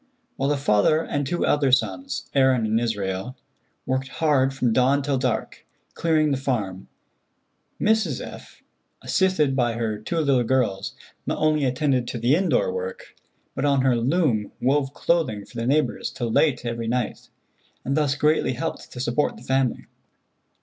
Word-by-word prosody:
While 135 +1 -1
the 145 - +1
father 140 +5 +3
and 145 -1 -2
two 175 +4 0
elder 140 -3 +2
sons, 270 - 0
Aaron 130 -4 +3
and 110 +1 +1
Israel, 105 +1 -3 0.5
worked 130 0 -1
hard 135 -2 +1
from 125 -4 0
dawn 135 +3 +3
till 140 -2 0
dark, 125 -3 -2 0.3
clearing 155 -2 +1
the 135 - +1
farm, 105 -9 -3 0.9
Mrs. 220 +1 +1
F., - - -10 0.4
assisted 185 -8 +2
by 120 -3 +1
her 110 -2 -2
two 135 +10 -4
little 140 -6 +2
girls, 110 - 0 0.3
not - - -1
only 155 -2 +2
attended 130 -1 0
to - - -4
the 120 +5 +3
indoor 195 - +1
work, 475 +1 -6 0.4
but - - -3
on 140 -2 +3
her 130 -2 +3
loom 125 - +1
wove 135 +1 +1
clothing 150 -12 0
for - - -13
the 115 +1 -2
neighbors 150 +3 +1
till 120 -2 -4
late 130 -1 +2
every 115 -1 -3
night, 120 0 -2 0.6
and 135 - 0
thus 145 -2 +1
greatly 150 -2 +2
helped 125 - -5
to 125 - -8
support 125 +2 0
the 115 - -13
family. 130 -1 0
135 Hz, 160 wpm, -24 LUFS, 120-150 Hz, 0.9 s, father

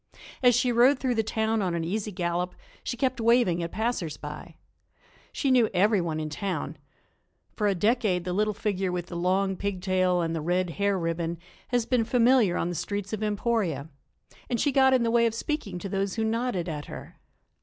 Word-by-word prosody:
As 245 -2 +5
she 245 +1 +2
rode 245 +4 +5
through 255 -1 0
the 225 - +2
town 220 0 0
on 180 -3 -1
an 165 - -1
easy 210 +5 -2
gallop 180 -1 -2 0.3
she 245 - -4
kept 260 0 0
waving 230 -7 +3
at 170 0 -4
passers 215 -9 -2
by. 150 +2 -8 0.8
She 275 - 0
knew 245 -4 +4
everyone 180 -5 +2
in 155 - -3
town. 165 -2 -3 0.8
For 210 - +1
a 200 - +2
decade 205 -2 +1
the 180 0 -3
little 210 +2 +1
figure 195 -3 -1
with 175 -1 -3
the 175 - -6
long 190 +2 +1
pig 200 0 -3
tail 185 -1 +1
and 165 0 -1
the 160 - -2
red 175 +2 0
hair 200 -1 +2
ribbon 165 0 -2 0.3
has 245 -2 0
been 245 -1 +2
familiar 240 -5 +3
on 170 - -1
the - - -3
streets 200 +4 -4
of 215 - -3
Emporia, 205 - -1 0.6
and 240 - 0
she 290 - +2
got 265 0 +5
in 250 - +2
the 230 - +1
way 235 0 +4
of 225 - -3
speaking 265 - -3
to 185 - -5
those 195 0 -2
who 225 - -1
nodded 225 -5 -1
at 150 -3 -4
her. - - -10
200 Hz, 200 wpm, -27 LUFS, 175-230 Hz, 0.8 s, As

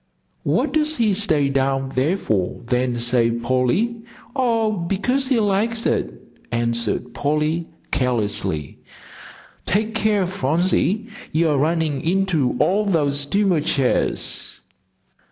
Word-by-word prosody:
"What - - 0
does 310 0 +1
he 220 -4 +2
stay 160 -9 +2
down 135 0 0
there 150 +9 +1
for, 100 - -1
then, 125 0 0
say, 120 0 +2
Polly?" 125 - 0 0.4
"Oh, 230 -4 +1
because 210 +8 -1
he 255 -3 +2
likes 220 +2 +1
it," - - 0 0.4
answered 115 -2 -1
Polly, 155 +3 0 0.2
carelessly. 105 - -1 0.9
"Take 215 +3 0
care, 215 -3 +2
Phronsie, 180 +5 +1 0.3
you're 155 -3 +2
running 155 -2 0
into 175 -6 +1
all 205 +3 +3
those 145 -6 +1
steamer 180 +3 +1
chairs." 135 -3 -1
160 Hz, 110 wpm, -21 LUFS, 130-205 Hz, 0.9 s, all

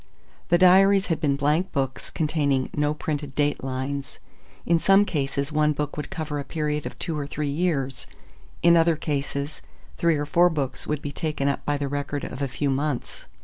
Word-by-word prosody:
The 175 - +5
diaries 190 +2 +6
had - - -5
been 140 -2 +2
blank 150 +6 +1
books 135 -3 -2
containing 150 -5 0
no 150 0 +1
printed 145 -3 -4
date 145 -2 0
lines. 135 +1 -4 0.5
In 170 -1 +3
some 195 +4 +5
cases 140 -3 -2
one 150 0 +2
book 150 0 -3
would 150 - -5
cover 155 -2 -4
a - - -3
period 150 -1 -2
of - - -9
two 165 - -3
or 145 -2 -3
three 150 -1 -3
years, 140 -5 -1 0.6
in 170 0 +7
other 165 0 +4
cases 145 -1 -3 0.4
three 165 -2 +2
or 145 - -2
four 175 +4 +4
books 140 -5 -3
would 150 -1 -2
be 145 - -3
taken 150 -3 -2
up 140 - -1
by 145 0 +1
the 140 0 -2
record 145 0 -3
of 130 - -6
a 140 - +1
few 140 +2 -1
months. 140 -1 -3
150 Hz, 190 wpm, -25 LUFS, 140-160 Hz, 0.6 s, in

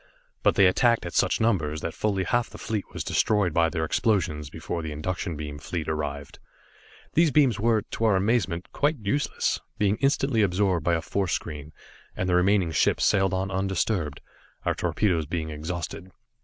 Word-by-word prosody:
But, - - +3
they 100 - +6
attacked 115 +4 +3
at 85 - -5
such - - +2
numbers 80 -9 0
that 85 - -3
fully 100 -3 0
half 120 +4 0
the - - -11
fleet 105 -3 -3
was - - -4
destroyed 105 -6 +1
by 85 0 +3
their 80 -1 -2
explosions 80 - 0
before 85 +2 -5
the 80 -1 -5
induction 85 +2 -3
beam 75 -1 -6
fleet 80 +2 -4
arrived. 75 -2 -4 0.7
These 165 0 +4
beams 135 -6 +3
were, 110 -1 +2
to 115 - -3
our 105 -3 +4
amazement, 95 -3 0
quite 150 +2 +1
useless, 120 +6 -1 0.2
being 105 0 +2
instantly 135 -3 +2
absorbed 95 -3 +1
by 85 +1 +2
a 80 - -2
force 95 -3 -1
screen, 75 -1 -5 0.5
and 90 - -1
the 90 - +1
remaining 90 -1 +3
ships 75 - +2
sailed 95 -1 +3
on 95 +1 -2
undisturbed, 95 -5 -1 0.4
our - - +2
torpedoes 85 -8 0
being 80 -1 -3
exhausted. 85 +4 -5
95 Hz, 175 wpm, -26 LUFS, 80-105 Hz, 0.7 s, they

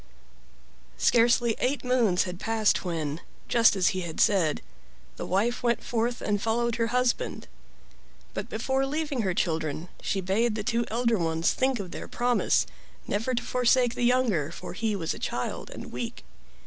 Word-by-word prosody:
Scarcely 235 0 +4
eight 265 +3 0
moons 235 -8 +3
had 180 -1 -6
passed 225 -1 +1
when, 160 -3 -3 0.3
just 230 -3 +5
as 185 -2 +3
he 185 - -2
had 165 -3 -6
said, 180 -7 +3 0.5
the - - -6
wife 220 +7 +1
went 235 -1 +1
forth 240 +1 -1
and 205 -1 0
followed 235 +1 0
her 230 -1 +1
husband; 250 - 0 0.9
but - - -5
before 270 0 0
leaving 295 -3 -1
her 190 -4 -1
children 160 0 -1
she 195 - -1
bade 210 +5 +1
the 215 - -3
two 235 +2 0
elder 235 -1 +1
ones 165 0 +1
think 260 -2 +1
of 185 -3 -6
their - - -7
promise 245 0 +2 0.4
never 225 +5 -1
to 240 - -2
forsake 250 0 +2
the 245 - -5
younger, 240 - +2
for - - -8
he 220 +2 -1
was 165 -5 -2
a - - -9
child - - -3
and - - -9
weak. - - -5
225 Hz, 165 wpm, -27 LUFS, 185-245 Hz, 0.9 s, just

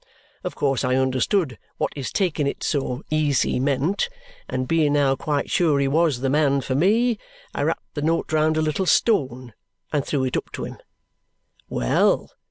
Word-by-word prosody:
Of - - -4
course 135 -3 0
I 125 0 +1
understood 130 - +1 0.2
what - - -1
his 140 -3 -5
taking 165 -8 0
it - - -4
so 135 -4 -1
easy 150 -5 +1
meant; 145 - 0 0.4
and 130 0 -2
being 155 -2 +2
now 140 -2 +3
quite 145 +1 -2
sure 160 -5 +3
he 140 - +2
was 150 -3 +2
the 135 - 0
man 140 -2 +2
for 130 - -3
me, 215 - +2 0.3
I - - -3
wrapped - - -2
the 145 - -4
note 160 +1 0
round 155 0 +2
a 155 - +2
little 155 +5 -1
stone 130 - +1 0.4
and 145 -2 +1
threw 140 -2 -1
it 130 - -1
up - - -3
to - - -5
him. - - -8 0.9
Well! - - +1
145 Hz, 180 wpm, -23 LUFS, 130-160 Hz, 0.9 s, now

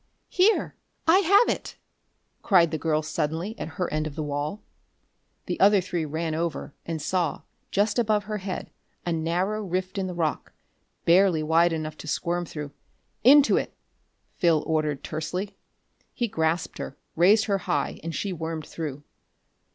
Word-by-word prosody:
"Here! 390 +5 +3 0.3
I 345 +4 +7
have 400 +5 +5
it!" - - -2 0.7
cried 170 -5 +4
the 160 - -2
girl 155 -1 +1
suddenly 160 +6 -2
at - - -4
her 180 - 0
end 155 0 0
of 145 - -8
the 155 - -3
wall. 145 +6 -3 0.8
The - - -3
other 200 +1 +6
three 175 -3 -2
ran 160 +2 -2
over, 160 -3 -3
and 165 -1 -2
saw, 175 +1 -1 0.3
just 205 +4 +1
above 215 -3 +2
her 210 +1 -4
head, 190 -1 -5 0.3
a 175 - 0
narrow 180 +6 -1
rift 185 +1 -2
in 190 - -1
the 180 - -5
rock, 160 -3 -2 0.5
barely 175 -2 +4
wide 165 +2 +4
enough 155 -1 -4
to - - -9
squirm 175 +3 -1
through. 150 -3 -6 0.5
"Into 280 +4 +7
it!" - - -3 0.6
Phil 165 -5 +3
ordered 155 -3 0
tersely. 170 +6 -4 0.6
He 240 - 0
grasped 160 -3 -1
her, 135 - -6 0.2
raised 200 +6 +5
her 200 -2 +1
high, 145 -5 -2
and 165 -1 -4
she 195 +6 -2
wormed 160 -2 -4
through. 150 -3 -6
170 Hz, 160 wpm, -26 LUFS, 155-195 Hz, 0.8 s, I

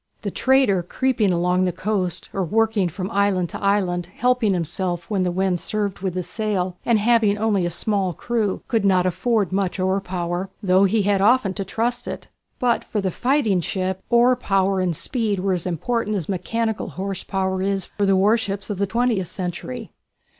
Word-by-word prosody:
The - - -2
trader 260 -8 +3
creeping 220 +2 0
along 180 +1 +2
the 180 - +1
coast 185 -1 -2
or 195 - -1
working 215 0 +1
from 185 +3 -5
island 195 -3 +1
to - - -7
island 185 -3 +1
helping 235 +2 +1
himself 175 +1 -2
when 200 -3 +1
the 180 - +1
wind 185 0 0
served 205 -1 -2
with 185 -1 -3
his 180 -1 -2
sail, 190 -2 -2
and 235 -2 +3
having 215 -1 +3
only 205 -4 +1
a - - -1
small 195 +2 0
crew, 215 +2 -2
could 225 -4 +1
not 185 -2 +3
afford 195 +2 0
much 190 0 -1
oar 190 +1 +1
power, 180 0 -3
though 190 +1 +4
he 205 +2 +2
had 200 -1 +2
often 215 -2 +3
to 195 - -3
trust 240 +5 -1
to - - -3
it. - - -11 0.3
But 245 -2 +1
for 215 - -3
the 190 -2 -1
fighting 240 - +1
ship, 190 +2 -2
oar 240 +1 +5
power 195 -4 +1
and 180 -3 0
speed 220 - -1
were 190 +1 0
as 180 0 -2
important 215 +5 -1
as 180 -6 -3
mechanical 220 +4 -2
horse 190 0 -4
power 190 -1 -1
is 195 -1 -1
for 200 -1 -2
the 195 - +4
warships 200 0 +1
of 195 - -4
the 200 - +1
twentieth 230 -4 0
century. 175 -9 -5
195 Hz, 190 wpm, -22 LUFS, 185-215 Hz, 0.3 s, oar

